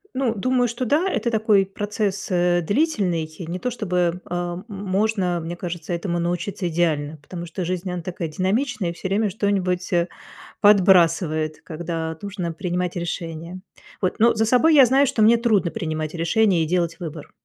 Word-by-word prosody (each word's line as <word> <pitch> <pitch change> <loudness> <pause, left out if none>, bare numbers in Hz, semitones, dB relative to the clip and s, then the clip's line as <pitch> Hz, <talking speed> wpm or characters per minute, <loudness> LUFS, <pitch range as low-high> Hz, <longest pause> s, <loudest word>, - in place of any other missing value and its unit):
Ну, 255 -4 +1
думаю, 245 +3 +1
что 240 +2 -3
да, 305 +10 +2
это 255 -10 0
такой 215 -3 +3
процесс, 205 0 -3
э, 175 0 +2
длительный. 195 - 0 0.2
Не 180 +2 -4
то 250 - -2
чтобы, 180 -6 -1
э, - - -6
м 175 +1 -3
можно, 195 -2 -1
мне 165 +1 -5
кажется, 175 -1 -5
этому 170 0 -2
научиться 175 +2 -2
идеально, 160 -3 0
потому 170 +4 -8
что 175 +2 -5
жизнь, 180 +1 -3
она 180 -1 -4
такая 170 -1 -4
динамичная, 195 - -1
и 170 - -4
всё 180 - -5
время 205 +2 +1
что-нибудь, 185 -3 -1
э, 170 0 +2 0.5
подбрасывает, 170 -6 +4
когда 160 0 -4
нужно 190 -4 -4
принимать 180 +1 -2
решения, 170 0 -5 0.4
вот. 185 - 0
Но 230 +2 +5
за 220 0 +1
собой 255 +8 +4
я 275 -3 +9
знаю, 265 +3 +4
что 225 - 0
мне 230 +2 +6
трудно 215 -7 +2
принимать 155 -5 -3
решения 170 +1 +2
и - - -2
делать 170 0 0
выбор. 160 -3 -7
180 Hz, 170 wpm, -22 LUFS, 170-210 Hz, 0.5 s, я